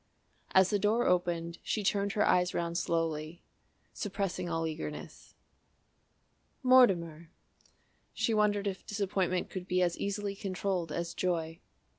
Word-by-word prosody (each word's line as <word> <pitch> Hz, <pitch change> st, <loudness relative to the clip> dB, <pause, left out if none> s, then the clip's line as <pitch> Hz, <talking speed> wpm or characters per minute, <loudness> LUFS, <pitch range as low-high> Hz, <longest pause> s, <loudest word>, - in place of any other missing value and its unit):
As 190 Hz, 0 st, +6 dB
the 205 Hz, -, +2 dB
door 215 Hz, +4 st, +2 dB
opened 170 Hz, -2 st, 0 dB
she 215 Hz, -, -2 dB
turned 200 Hz, +1 st, +1 dB
her 210 Hz, -, +2 dB
eyes 180 Hz, 0 st, +3 dB
round 170 Hz, 0 st, -1 dB
slowly, 165 Hz, -1 st, -2 dB, 0.5 s
suppressing 195 Hz, -3 st, -3 dB
all 165 Hz, -1 st, -1 dB
eagerness. 155 Hz, -1 st, -7 dB, 1.3 s
"Mortimer!" 175 Hz, -11 st, +4 dB, 0.8 s
She 230 Hz, -, 0 dB
wondered 210 Hz, -1 st, +2 dB
if 195 Hz, -1 st, -3 dB
disappointment 190 Hz, -3 st, -1 dB
could 185 Hz, -1 st, -6 dB
be 185 Hz, 0 st, +2 dB
as 175 Hz, -1 st, 0 dB
easily 200 Hz, 0 st, -2 dB
controlled 190 Hz, -3 st, -2 dB
as 170 Hz, 0 st, -3 dB
joy. 165 Hz, -2 st, -2 dB
180 Hz, 125 wpm, -31 LUFS, 170-200 Hz, 1.3 s, As